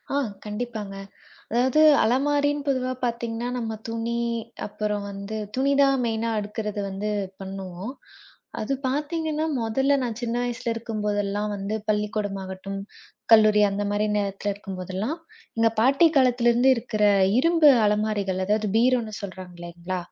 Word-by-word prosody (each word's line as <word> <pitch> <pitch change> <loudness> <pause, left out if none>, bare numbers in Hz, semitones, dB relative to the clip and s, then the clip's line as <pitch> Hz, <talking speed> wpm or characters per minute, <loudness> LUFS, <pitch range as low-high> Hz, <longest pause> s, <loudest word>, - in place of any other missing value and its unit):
ஆ - - +2 0.3
கண்டிப்பாங்க. 210 -2 -5 0.6
அதாவது 255 +6 +3 0.2
அலமாரின் 290 +4 +1
பொதுவா 255 -2 0
பார்த்தீங்கன்னா 235 0 -2
நம்ம 225 -2 -3 0.2
துணி 230 +1 -2 0.5
அப்புறம் 210 0 -3
வந்து 200 +2 -6 0.2
துணிதான் 275 0 +3
மெயின்னா 230 0 -1
அடுக்குறது 210 0 -4
வந்து 195 +2 -3 0.3
பண்ணுவோம். 190 +2 -6 0.7
அது 215 - -2 0.2
பார்த்தீங்கன்னா 310 +2 -1 0.2
மொதல்ல 265 +5 +2
நான் 235 -3 -3
சின்ன 235 0 -1
வயசுல 240 -1 -2
இருக்கும் 225 -2 -4
போதெல்லாம் 205 0 -1
வந்து 200 +2 -3
பள்ளிக்கூடம் 210 -1 -1
ஆகட்டும், 190 +1 -6 0.5
கல்லூரி 215 -1 +7
அந்த 200 +1 -2
மாரி 205 +1 +1
நேரத்துல 200 0 -2
இருக்கும் 195 -2 -8
போதெல்லாம், 190 - -3 0.4
எங்க 225 0 +5
பாட்டி 275 +7 +5
காலத்துல 245 -2 +4
இருந்து 245 +3 +4
இருக்கிற 220 -2 -3 0.4
இரும்பு 330 -1 +6 0.2
அலமாரிகள் 205 -3 0
அதாவது 210 +1 +1
பீரோன்னு 235 -2 +2
சொல்றாங்கள்ல, 180 -2 -7
220 Hz, 125 wpm, -25 LUFS, 205-250 Hz, 0.7 s, கல்லூரி